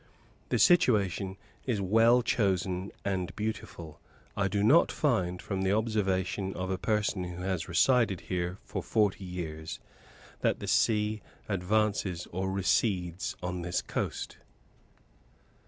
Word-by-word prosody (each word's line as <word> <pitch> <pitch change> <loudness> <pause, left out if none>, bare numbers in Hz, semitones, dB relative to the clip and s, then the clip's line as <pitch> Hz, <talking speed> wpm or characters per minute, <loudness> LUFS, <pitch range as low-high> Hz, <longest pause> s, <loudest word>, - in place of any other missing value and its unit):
The - - +2
situation 100 - +3 0.3
is 115 -5 +1
well 115 +5 +4
chosen 95 -4 0
and 95 -3 -2
beautiful. 100 -7 -5 0.4
I 100 -1 +1
do 100 +1 0
not 150 +11 +5
find, 90 - 0
from 95 -2 -3
the 95 +1 +2
observation 95 -3 0
of 95 +1 -3
a 95 - -2
person 105 -3 0
who 90 0 -6
has 90 -3 -2
resided 110 +1 +3
here 90 0 -3
for - - -4
forty 105 -3 +1
years, 80 -3 -5 0.6
that - - +1
the - - -5
sea 105 -1 +2 0.3
advances 100 -2 0
or 95 +2 -2
recedes 95 -2 0
on 90 0 -3
this 90 +1 -1
coast. - - -4
95 Hz, 125 wpm, -30 LUFS, 90-105 Hz, 0.6 s, not